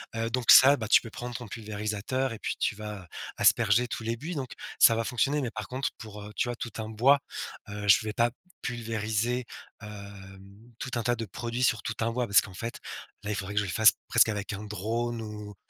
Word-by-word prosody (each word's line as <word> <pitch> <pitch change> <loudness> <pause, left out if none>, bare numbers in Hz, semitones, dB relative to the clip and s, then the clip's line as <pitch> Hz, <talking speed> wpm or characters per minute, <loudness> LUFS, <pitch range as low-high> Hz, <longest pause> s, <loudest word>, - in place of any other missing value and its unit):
heu, 115 0 -1
donc 120 0 +3
ça, 140 +2 +9
bah, 110 -3 -4
tu - - +6
peux 115 - -9
prendre 120 +1 -7
ton 120 -3 -6
pulvérisateur 110 +4 -3
et 110 - -8
puis - - -2
tu - - 0
vas 105 -3 -7 0.3
asperger 115 +2 +4
tous 115 - -5
les 115 +1 -1
buis, 160 +7 -5
donc 130 -3 -4 0.3
ça 115 - +8
va 115 - 0
fonctionner, 140 +4 +1
mais 125 - -2
par 110 -2 -6
contre, 130 +1 -2
pour, 105 -2 -9
heu, 105 - -9
tu 120 - 0
vois, - - -1
heu, 120 - -10
tout 115 -4 -5
un 110 - -5
bois, 130 +6 +4 0.5
heu, 105 0 -5
je 105 +3 +6
vais 110 - -3
pas 120 +2 +3 0.3
pulvériser, 115 +1 -2 0.4
hem, 100 +1 -11
tout 125 - -5
un 115 - -1
tas 120 +1 +1
de 115 -1 -4
produits 120 +5 -4
sur 115 -3 +2
tout 115 - -3
un 115 +1 +1
bois, 125 0 -1
parce 100 - +6
qu'en 100 - -10
fait, 115 +4 -5 0.4
là, 105 - -3
il - - -1
faudrait 95 +2 -5
que - - +4
je - - -2
le 90 - -4
fasse 110 +2 +6 0.2
presque - - +5
avec 105 -1 -3
un 100 +1 -6
drone 115 +4 -2
ou 105 -1 -8
110 Hz, 235 wpm, -28 LUFS, 105-120 Hz, 0.5 s, ça